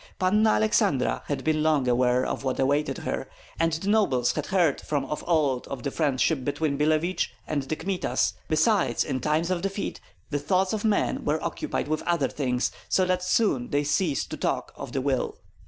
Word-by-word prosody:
Panna 210 +4 +3
Aleksandra 110 +5 +2
had 145 - -2
been 155 -1 +1
long 155 -4 +2
aware 125 +1 +3
of - - -3
what 130 -2 -1
awaited 145 +3 +1
her, - - -4 0.3
and 165 0 +2
the 165 +5 -3
nobles 135 - +3
had 150 - -4
heard 175 -7 +2
from 145 -3 -2
of 150 - -4
old 145 -7 +1
of 130 -3 -6
the 140 - -2
friendship 145 -1 +1
between 145 +1 -1
Billevich 155 +5 +1
and 150 -2 -1
the 135 +4 -3
Kmitas; 185 +3 -1
besides, 155 - +2
in 130 - -2
time 155 +5 +1
of 180 -2 0
defeat 195 +2 -3 0.3
the 145 - 0
thoughts 185 +7 +1
of 215 - -2
men 215 -2 +1
were 150 +2 +1
occupied - - -2
with 155 0 -1
other 170 -6 +1
things, 125 -3 -1 0.2
so 185 - +3
that 185 0 +1
soon 180 - +1
they 145 +1 +1
ceased 145 +1 0
to - - -4
talk - - -2
of - - -7
the 135 - -1
will. 130 -1 -1
150 Hz, 190 wpm, -26 LUFS, 135-180 Hz, 0.3 s, Panna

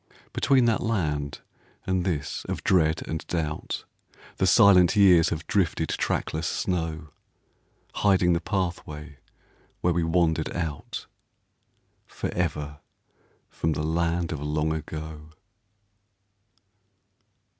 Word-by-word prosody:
Between 130 -3 +3
that 115 -2 +2
land 75 -11 -1 0.4
and 95 -1 0
this 80 -6 -2
of - - -4
dread 80 -4 +2
and 80 - -3
doubt, 80 -3 -3 0.5
The - - +2
silent 90 -2 +6
years 90 -5 +6
have 85 0 -4
drifted 95 -5 0
trackless 80 +1 -1
snow; 80 -6 -2 0.8
Hiding 95 -3 +3
the 85 - 0
pathway 80 -6 -4 0.6
where 90 - +2
we 85 0 +1
wandered 80 -1 +1
out, 80 -4 -4 1.0
Forever 75 -4 -3 0.7
from 80 0 -1
the 75 - -3
land 85 +1 0
of 80 - -3
Long 75 +1 0
Ago. 80 0 -7
80 Hz, 100 wpm, -26 LUFS, 75-90 Hz, 1.0 s, silent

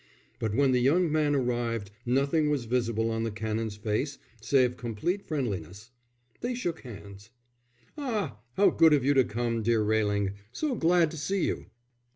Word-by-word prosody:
But 110 -2 -1
when 140 -1 +4
the 125 - +3
young 155 +7 +3
man 150 -2 +2
arrived 120 -5 -1 0.2
nothing 140 +5 +2
was 140 -5 0
visible 115 -1 0
on 115 0 -1
the 115 - -1
Canon's 110 0 -3
face 110 +7 -2 0.2
save 125 0 +3
complete 125 - -2
friendliness. 105 - -4 0.5
They 245 +1 -2
shook 175 -9 -3
hands. 100 -3 -11 0.7
"Ah, 210 - -2 0.2
how 200 - +5
good 160 -2 +5
of 140 -3 +2
you 140 - +4
to 135 -2 +5
come, 115 0 -2
dear 115 0 +2
Railing. 105 -2 +1 0.2
So 300 - -2
glad 170 -5 +3
to 160 - -7
see 190 +5 0
you." - - -3
125 Hz, 165 wpm, -28 LUFS, 110-155 Hz, 0.7 s, how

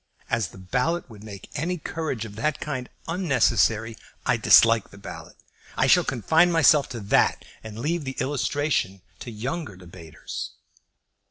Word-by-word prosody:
As 110 -5 +1
the - - -15
ballot 125 - -1
would 105 -1 -13
make 100 -3 -10
any 180 +4 -2
courage 155 -7 -4
of 105 -2 -10
that 140 +7 -1
kind 130 -4 -4 0.2
unnecessary, 115 - +1 0.3
I - - +3
dislike 115 -1 +5
the 100 - -15
ballot. 100 - -10 0.4
I - - +3
shall - - +5
confine 160 +8 +2
myself 155 -3 +4
to 120 - -6
that, 100 - +2 0.2
and 110 -1 -9
leave 160 +7 -1
the 135 -1 -6
illustration 140 -8 -1 0.2
to - - -7
younger 125 - -5
debaters." 85 -3 -9
125 Hz, 150 wpm, -25 LUFS, 105-155 Hz, 0.4 s, dislike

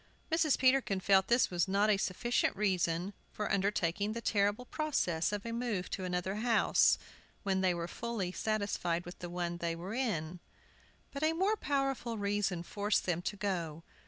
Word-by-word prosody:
Mrs. 320 -3 +3
Peterkin 255 -7 +3
felt 190 0 +4
this 240 -3 +3
was 175 -1 +1
not 200 +3 +3
a 205 - +3
sufficient 195 +5 0
reason 185 -2 0 0.2
for 210 - -3
undertaking 200 0 0
the 230 - -3
terrible 205 +1 +1
process 245 - 0
of 205 0 -3
a 230 - -3
move 230 -6 -2
to 190 - -3
another 180 +2 -2
house, 230 +1 +4 0.5
when 190 -1 +1
they 185 -2 +2
were 170 0 -3
fully 225 -4 -3
satisfied 200 -5 -1
with 175 - -9
the 175 - -6
one 175 -1 -3
they 170 -1 -2
were 180 +5 -6
in. 180 -9 -2 0.7
But 280 - -6
a 315 +1 +3
more 385 +6 +2
powerful 275 - -1
reason 200 -4 -1
forced 205 +3 0
them 175 -2 0
to 190 - -3
go. 170 -5 -3
200 Hz, 170 wpm, -33 LUFS, 180-235 Hz, 0.7 s, felt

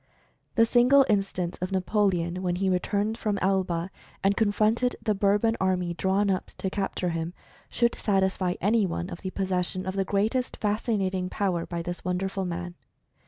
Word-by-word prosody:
The 230 -2 +6
single 250 +4 +5
instance 195 -4 0
of 185 +1 -2
Napoleon, 185 -2 +1
when 180 -1 0
he 190 +1 +1
returned 205 +4 0
from 210 -2 -1
Elba, 185 -2 0 0.3
and 195 +1 +3
confronted 220 +3 +2
the 220 -1 0
Bourbon 205 +3 +2
army 180 -2 +1
drawn 195 +3 +1
up 185 - -1
to 190 - -3
capture 195 -2 -2
him, 165 +1 -3 0.3
should 235 0 +1
satisfy 190 -3 0
any 210 +1 +2
one 175 +2 -4
of 170 - -7
the 190 - -3
possession 185 -1 -1
of 190 - -2
the 195 - +1
greatest 215 +7 0
Fascinating 200 -4 -1
power 185 -5 -1
by 170 -1 -4
this 175 +1 -5
wonderful 190 +1 -2
man. 175 0 -4
190 Hz, 165 wpm, -27 LUFS, 180-205 Hz, 0.3 s, The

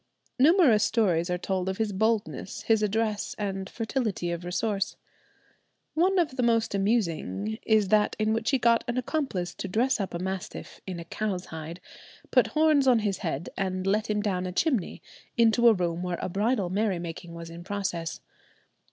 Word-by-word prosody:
Numerous 280 - +6
stories 180 -7 +2
are 180 - 0
told 185 +1 -2
of 190 - -3
his 220 -2 0
boldness, 220 -1 -1
his 220 -1 +3
address, 215 0 -1
and 195 -2 -3
fertility 220 -7 -2
of 170 0 -4
resource. 195 +3 -1 1.0
One 370 +4 +2
of 300 -7 +1
the - - +1
most 230 -3 +2
amusing 165 - 0
is 215 -3 +3
that 210 -1 +3
in 215 0 +1
which 225 0 0
he 270 - +3
got 235 -2 +3
an 240 +1 -2
accomplice 250 - -2
to - - -5
dress 235 +7 +1
up 190 -3 -3
a - - 0
mastiff 190 +1 -5
in 180 -2 -4
a 170 - -7
cow's 190 0 -3
hide, 160 +2 -7 0.5
put - - +5
horns 305 -3 +3
on 250 -2 +6
his 195 -2 -1
head, 165 -3 -3
and 185 -1 -2
let 210 +3 +1
him 210 -1 0
down 185 -3 -1
a - - -4
chimney, 245 - 0 0.3
into 235 +1 +5
a 230 - +8
room 175 -3 -1
where 180 -1 -2
a - - -3
bridal 205 0 0
merrymaking 175 -4 -2
was 165 0 -8
in 170 +1 -9
progress. 185 -4 -3
200 Hz, 180 wpm, -27 LUFS, 180-230 Hz, 1.0 s, a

